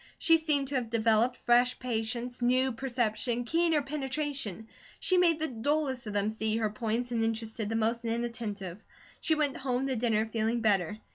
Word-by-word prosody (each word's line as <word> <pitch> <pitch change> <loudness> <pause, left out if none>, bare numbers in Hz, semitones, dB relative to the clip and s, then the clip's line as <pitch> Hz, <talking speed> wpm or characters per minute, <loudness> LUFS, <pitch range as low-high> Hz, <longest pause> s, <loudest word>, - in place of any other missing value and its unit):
She 330 -1 +5
seemed 295 -4 0
to - - -6
have 240 -3 -3
developed 230 +2 +2
fresh 245 +1 +3
patience, 240 +1 -2
new 255 +2 +3
perception, 240 -1 -1
keener 330 +1 +2
penetration; 270 - -2 0.3
she 370 - +3
made 340 -3 +4
the 315 0 -1
dullest 265 0 -1
of 210 - -4
them 205 +1 +1
see 220 0 -1
her 220 -2 0
points, 230 +2 -2
and 230 -1 0
interested 225 -1 -2
the 225 - -2
most 230 +1 0
inattentive. 225 -5 -4 0.4
She 320 - +2
went 295 -3 0
home 260 -1 -1
to 265 -1 -1
dinner 220 -2 +1
feeling 225 +1 -1
better. 205 -2 +1
240 Hz, 170 wpm, -30 LUFS, 220-265 Hz, 0.4 s, She